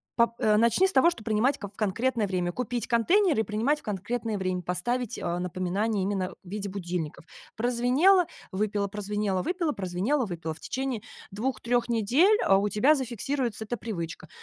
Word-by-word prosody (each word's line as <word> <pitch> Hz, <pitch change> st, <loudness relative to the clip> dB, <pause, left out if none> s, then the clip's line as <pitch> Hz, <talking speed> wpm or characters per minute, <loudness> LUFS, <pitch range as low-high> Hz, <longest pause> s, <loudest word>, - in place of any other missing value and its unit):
пап 235 Hz, -1 st, +3 dB
э, 210 Hz, -1 st, +3 dB
начни 235 Hz, -, +4 dB
с -, -, -3 dB
того, 340 Hz, +2 st, +5 dB
что 220 Hz, -, -9 dB
принимать 230 Hz, +6 st, +1 dB
ка 205 Hz, -, -5 dB
в 200 Hz, -, -20 dB
конкретное 225 Hz, +3 st, 0 dB
время, 180 Hz, -2 st, -1 dB
купить 240 Hz, +2 st, -3 dB
контейнеры 315 Hz, -, +3 dB
и -, -, 0 dB
принимать 230 Hz, +9 st, 0 dB
в -, -, -36 dB
конкретное 215 Hz, +2 st, -3 dB
время, 185 Hz, -1 st, -2 dB
поставить, 240 Hz, +7 st, -2 dB
а, 175 Hz, 0 st, -1 dB
напоминание 185 Hz, +4 st, -1 dB
именно 190 Hz, -1 st, -1 dB
в 180 Hz, -, -13 dB
виде 200 Hz, 0 st, -4 dB
будильников. 175 Hz, -5 st, -4 dB, 0.3 s
Прозвенело- 250 Hz, -, +4 dB, 0.3 s
выпила, 205 Hz, +1 st, -1 dB
прозвенело- 205 Hz, -2 st, -2 dB
выпила, 345 Hz, -5 st, -1 dB
прозвенело- 200 Hz, +9 st, 0 dB
выпила. 165 Hz, -4 st, -5 dB
В -, -, -16 dB
течение 260 Hz, -4 st, -3 dB, 0.3 s
2, 235 Hz, +7 st, -3 dB
3 240 Hz, 0 st, +1 dB
недель, 255 Hz, -, +4 dB
а, 195 Hz, -, +5 dB
у 205 Hz, +1 st, +1 dB
тебя 260 Hz, +10 st, +4 dB
зафиксируется 245 Hz, -2 st, -2 dB
эта 240 Hz, +3 st, -3 dB
привычка. 170 Hz, -7 st, -5 dB
215 Hz, 175 wpm, -27 LUFS, 195-250 Hz, 0.3 s, того